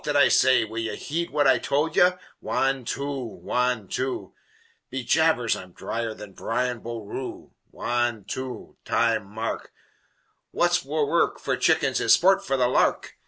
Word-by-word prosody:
that 145 Hz, -1 st, 0 dB
I 140 Hz, -, +6 dB
say 130 Hz, -3 st, +4 dB
Will 110 Hz, +1 st, -6 dB
ye 115 Hz, 0 st, -3 dB
heed 170 Hz, +3 st, -3 dB
what 145 Hz, -1 st, +1 dB
I 130 Hz, -2 st, +5 dB
told 150 Hz, +6 st, 0 dB
ye? 180 Hz, -, +6 dB, 0.3 s
Wan 135 Hz, -2 st, 0 dB
two 140 Hz, +4 st, -3 dB
Wan 125 Hz, -1 st, -2 dB
two! 130 Hz, +4 st, -3 dB, 0.6 s
Be 130 Hz, 0 st, -4 dB
jabers, 160 Hz, -5 st, +2 dB
I'm 90 Hz, -1 st, -10 dB
dhryer 115 Hz, +2 st, -4 dB
than 105 Hz, -2 st, -11 dB
Brian 125 Hz, +3 st, -2 dB
Boru! 115 Hz, +2 st, -7 dB, 0.2 s
Wan 120 Hz, -4 st, -1 dB
two! 130 Hz, +2 st, -6 dB
Time! 115 Hz, -2 st, +1 dB
Mark! 110 Hz, +3 st, -5 dB, 0.8 s
What's 175 Hz, 0 st, +1 dB
wur 150 Hz, +2 st, 0 dB
ruk 170 Hz, +4 st, +1 dB
for -, -, -1 dB
chickens -, -, +2 dB
is -, -, +6 dB
sport 195 Hz, +2 st, +3 dB
for 135 Hz, -, 0 dB
the 125 Hz, -1 st, +3 dB
lark!" 125 Hz, -, +1 dB
125 Hz, 160 wpm, -25 LUFS, 115-145 Hz, 0.8 s, I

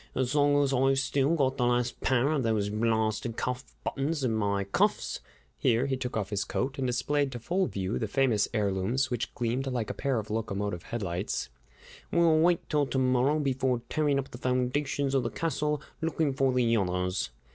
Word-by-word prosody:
As 130 Hz, +1 st, 0 dB
long 145 Hz, -1 st, +4 dB
as 135 Hz, -1 st, 0 dB
I've 135 Hz, +1 st, +3 dB
still 140 Hz, +3 st, +2 dB
got 135 Hz, -3 st, +1 dB
the 125 Hz, -, +2 dB
last 120 Hz, 0 st, 0 dB
pair 130 Hz, +2 st, +2 dB
of 150 Hz, -3 st, +1 dB
those 110 Hz, -3 st, 0 dB
blarsted 110 Hz, +1 st, 0 dB
cuff 125 Hz, +1 st, -2 dB, 0.2 s
buttons 145 Hz, +1 st, -2 dB
in 120 Hz, -3 st, +1 dB
my 100 Hz, -2 st, 0 dB
cuffs," 100 Hz, -, 0 dB, 0.4 s
here 115 Hz, +3 st, +2 dB
he 135 Hz, -1 st, 0 dB
took 125 Hz, -3 st, -4 dB
off 105 Hz, -2 st, -3 dB
his 100 Hz, -1 st, 0 dB
coat 135 Hz, +7 st, -3 dB
and 130 Hz, -, 0 dB
displayed 135 Hz, +3 st, 0 dB
to 120 Hz, -, -5 dB
full 180 Hz, +9 st, 0 dB
view 95 Hz, +2 st, -2 dB
the 110 Hz, -, -1 dB
famous 120 Hz, -3 st, +2 dB
heirlooms, 105 Hz, +5 st, 0 dB
which 120 Hz, -2 st, -2 dB
gleamed 125 Hz, +3 st, -1 dB
like 120 Hz, -5 st, -2 dB
a -, -, -5 dB
pair 135 Hz, -3 st, -1 dB
of 110 Hz, -1 st, -4 dB
locomotive 100 Hz, -4 st, -2 dB
headlights, 95 Hz, -5 st, -3 dB, 0.6 s
"we'll 165 Hz, -2 st, +4 dB
wait 170 Hz, +1 st, +2 dB
till 145 Hz, -2 st, +1 dB
to 130 Hz, -, -2 dB
morrow 130 Hz, +3 st, +3 dB
before 130 Hz, -4 st, 0 dB
tearing 150 Hz, -3 st, +1 dB
up 135 Hz, -1 st, -3 dB
the 120 Hz, -, -9 dB
foundations 135 Hz, +2 st, 0 dB
of 135 Hz, -, +3 dB
the 120 Hz, -, -2 dB
castle 150 Hz, -1 st, -1 dB, 0.2 s
looking 160 Hz, -3 st, 0 dB
for 135 Hz, 0 st, +2 dB
the 120 Hz, -2 st, +2 dB
others!" 90 Hz, -, 0 dB
125 Hz, 190 wpm, -29 LUFS, 110-140 Hz, 0.6 s, long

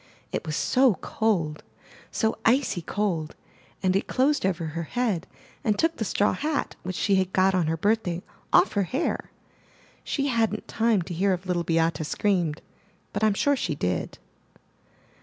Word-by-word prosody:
It -, -, -3 dB
was 155 Hz, -, -2 dB
so 255 Hz, +1 st, +3 dB
cold, 170 Hz, -6 st, -1 dB, 0.5 s
so 220 Hz, -1 st, 0 dB
icy 245 Hz, -7 st, +2 dB
cold, 165 Hz, -3 st, -2 dB, 0.5 s
and 185 Hz, 0 st, +2 dB
it 195 Hz, -, 0 dB
closed 265 Hz, -5 st, +2 dB
over 175 Hz, -3 st, -1 dB
her 160 Hz, +2 st, -4 dB
head 200 Hz, -1 st, -1 dB, 0.4 s
and 210 Hz, -2 st, +1 dB
took 325 Hz, +6 st, +1 dB
the 220 Hz, -, -2 dB
straw 205 Hz, +2 st, +2 dB
hat, 300 Hz, 0 st, -2 dB
which 185 Hz, 0 st, -5 dB
she 200 Hz, +1 st, +2 dB
had 190 Hz, -1 st, +1 dB
got 190 Hz, +1 st, +4 dB
on 180 Hz, -4 st, +2 dB
her 165 Hz, +1 st, 0 dB
birthday, 185 Hz, -2 st, 0 dB, 0.3 s
off 195 Hz, +5 st, +5 dB
her 205 Hz, -, +2 dB
hair. 275 Hz, +6 st, -1 dB, 0.7 s
She 275 Hz, -, -1 dB
hadn't 225 Hz, -3 st, 0 dB
time 225 Hz, -5 st, +2 dB
to 175 Hz, -, -6 dB
hear 190 Hz, +3 st, +2 dB
if 180 Hz, +1 st, -4 dB
Little 180 Hz, -2 st, 0 dB
Beate 165 Hz, -2 st, +1 dB
screamed, 170 Hz, -2 st, 0 dB, 0.5 s
but 205 Hz, -, -2 dB
Tm 215 Hz, -2 st, +3 dB
sure 285 Hz, +7 st, +3 dB
she 190 Hz, -, -2 dB
did. 90 Hz, -, -2 dB
190 Hz, 165 wpm, -26 LUFS, 170-225 Hz, 0.7 s, off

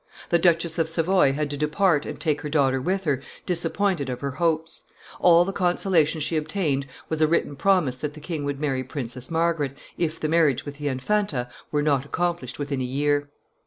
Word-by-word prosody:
The 170 Hz, -, +4 dB
Duchess 170 Hz, -1 st, +2 dB
of 160 Hz, -1 st, +1 dB
Savoy 165 Hz, -3 st, +3 dB
had 145 Hz, 0 st, -2 dB
to 145 Hz, -, -3 dB
depart 150 Hz, +1 st, +2 dB
and -, -, -6 dB
take 155 Hz, -3 st, 0 dB
her 150 Hz, -, -4 dB
daughter 135 Hz, -3 st, +2 dB
with 190 Hz, +7 st, -1 dB
her, 140 Hz, -6 st, 0 dB, 0.2 s
disappointed 175 Hz, -3 st, 0 dB
of 125 Hz, -1 st, -4 dB
her 140 Hz, -1 st, -2 dB
hopes; 165 Hz, +2 st, -1 dB, 0.4 s
all 175 Hz, 0 st, +6 dB
the 195 Hz, -, -3 dB
consolation 175 Hz, -4 st, +2 dB
she 155 Hz, +2 st, +1 dB
obtained 155 Hz, -4 st, -1 dB, 0.2 s
was 160 Hz, -1 st, -2 dB
a 155 Hz, -, +5 dB
written 150 Hz, -3 st, 0 dB
promise 175 Hz, -7 st, +2 dB
that 150 Hz, +2 st, -4 dB
the -, -, -9 dB
king 155 Hz, -1 st, -4 dB
would 145 Hz, -1 st, -3 dB
marry 135 Hz, -3 st, -1 dB
Princess 130 Hz, -2 st, -5 dB
Margaret, 160 Hz, -4 st, 0 dB, 0.2 s
if 165 Hz, -1 st, -1 dB
the 155 Hz, -, -1 dB
marriage 155 Hz, -5 st, +2 dB
with 145 Hz, 0 st, -8 dB
the 145 Hz, -, -2 dB
Infanta 135 Hz, -1 st, -1 dB, 0.2 s
were 150 Hz, -1 st, +1 dB
not 140 Hz, -3 st, +2 dB
accomplished 170 Hz, -4 st, -2 dB
within 140 Hz, -2 st, -2 dB
a -, -, 0 dB
year. 145 Hz, +3 st, 0 dB
150 Hz, 200 wpm, -24 LUFS, 140-170 Hz, 0.4 s, all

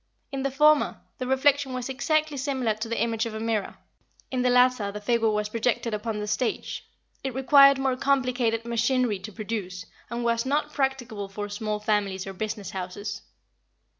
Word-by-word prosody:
In 275 Hz, -1 st, -3 dB
the 275 Hz, -, 0 dB
former, 300 Hz, +2 st, +3 dB, 0.2 s
the 255 Hz, -, -3 dB
reflection 270 Hz, +1 st, +2 dB
was 250 Hz, -1 st, -3 dB
exactly 305 Hz, +3 st, 0 dB
similar 265 Hz, -4 st, 0 dB
to 215 Hz, +2 st, -5 dB
the 230 Hz, -, -1 dB
image 225 Hz, -1 st, 0 dB
of 220 Hz, -, -6 dB
a -, -, -4 dB
mirror; 220 Hz, -3 st, -2 dB, 0.5 s
in 255 Hz, -1 st, 0 dB
the 250 Hz, -, +3 dB
latter, 250 Hz, -4 st, +4 dB
the 210 Hz, -, -6 dB
figure 225 Hz, +1 st, +2 dB
was 210 Hz, 0 st, 0 dB
projected 230 Hz, 0 st, 0 dB
upon 210 Hz, +1 st, -2 dB
the 210 Hz, -, -3 dB
stage. 215 Hz, +3 st, -2 dB, 0.4 s
It 265 Hz, -2 st, -3 dB
required 275 Hz, +1 st, +7 dB
more 265 Hz, -1 st, +1 dB
complicated 250 Hz, -4 st, +1 dB
machinery 235 Hz, -2 st, +1 dB
to 215 Hz, +3 st, -8 dB
produce, 200 Hz, -4 st, -5 dB, 0.2 s
and 235 Hz, 0 st, -3 dB
was 235 Hz, 0 st, +1 dB
not 295 Hz, +2 st, -1 dB
practicable 250 Hz, -7 st, -2 dB
for 205 Hz, +1 st, -5 dB
small 210 Hz, +1 st, -3 dB
families 205 Hz, -3 st, 0 dB
or 195 Hz, -, -6 dB
business 210 Hz, -1 st, -4 dB
houses. 195 Hz, +2 st, -5 dB
235 Hz, 175 wpm, -26 LUFS, 210-265 Hz, 0.5 s, required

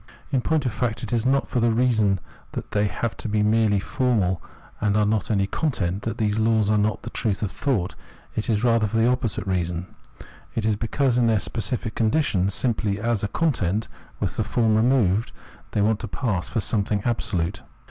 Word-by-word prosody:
In 135 Hz, -3 st, +2 dB
point 155 Hz, +1 st, +1 dB
of 125 Hz, -, +1 dB
fact 120 Hz, +1 st, -2 dB
it 115 Hz, -, -3 dB
is 120 Hz, +1 st, +1 dB
not 135 Hz, +1 st, +2 dB
for 125 Hz, -, -1 dB
the 120 Hz, 0 st, +3 dB
reason 110 Hz, -5 st, +2 dB, 0.3 s
that -, -, -5 dB
they 105 Hz, 0 st, +2 dB
have 115 Hz, +2 st, -3 dB
to 115 Hz, -, -4 dB
be 105 Hz, 0 st, +2 dB
merely 105 Hz, -1 st, +3 dB
formal 100 Hz, -6 st, 0 dB, 0.4 s
and 105 Hz, -1 st, +1 dB
are 105 Hz, -, +3 dB
not 105 Hz, -1 st, +1 dB
to -, -, -1 dB
have -, -, +2 dB
any 100 Hz, -, +2 dB
content, 100 Hz, -, -1 dB
that 110 Hz, +1 st, -3 dB
these 105 Hz, -1 st, +1 dB
laws 110 Hz, -1 st, +3 dB
are 105 Hz, -, +3 dB
not 105 Hz, +1 st, 0 dB
the -, -, -6 dB
truth 110 Hz, -4 st, -1 dB
of 100 Hz, -, -1 dB
thought; 110 Hz, -11 st, -1 dB, 0.4 s
it 110 Hz, -, -2 dB
is 110 Hz, -1 st, +1 dB
rather 115 Hz, -3 st, +3 dB
for 115 Hz, -, -2 dB
the 115 Hz, -, +4 dB
opposite 125 Hz, -5 st, 0 dB
reason. 90 Hz, -1 st, -2 dB, 0.6 s
It 110 Hz, -, -1 dB
is 110 Hz, -1 st, +2 dB
because 120 Hz, +3 st, +1 dB
in 120 Hz, -, +3 dB
their 110 Hz, -1 st, +3 dB
specific 110 Hz, +2 st, -3 dB
condition, 110 Hz, -, +1 dB
simply 105 Hz, -2 st, 0 dB
as 115 Hz, -1 st, 0 dB
a -, -, +1 dB
content 110 Hz, -, 0 dB, 0.3 s
with -, -, -2 dB
the -, -, +2 dB
form 110 Hz, -2 st, +2 dB
removed, 110 Hz, -3 st, +2 dB, 0.4 s
they 105 Hz, -, +1 dB
want 110 Hz, 0 st, +2 dB
to 115 Hz, -, -5 dB
pass 100 Hz, -5 st, -2 dB
for 115 Hz, -, -1 dB
something 100 Hz, 0 st, 0 dB
absolute. 105 Hz, -7 st, -1 dB
110 Hz, 210 wpm, -24 LUFS, 100-120 Hz, 0.6 s, the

